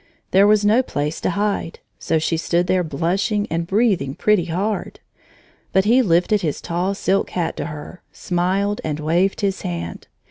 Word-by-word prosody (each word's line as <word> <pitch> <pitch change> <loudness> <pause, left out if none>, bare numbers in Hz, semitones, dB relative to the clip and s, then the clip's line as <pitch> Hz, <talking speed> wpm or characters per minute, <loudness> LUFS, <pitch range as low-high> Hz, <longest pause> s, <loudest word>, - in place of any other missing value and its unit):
There 195 +2 +5
was 210 0 +4
no 220 +5 +5
place 150 - -3
to - - 0
hide, 200 -2 -1 0.2
so 160 - 0
she 160 +1 0
stood 170 +2 0
there 185 0 +1
blushing 185 +8 -1
and 165 +1 -1
breathing 195 - +1
pretty 205 -1 +2
hard. 195 +5 -3 0.7
But 190 +1 +3
he 240 +5 +5
lifted 185 0 +2
his 155 -5 -2
tall 180 +4 -2
silk 195 0 0
hat 170 -3 -2
to - - -3
her, 150 +3 -9
smiled, 190 +3 -1
and 155 -1 -3
waved 175 +7 +1
his 195 -2 -1
hand. 85 -1 -5
180 Hz, 170 wpm, -21 LUFS, 165-205 Hz, 0.7 s, There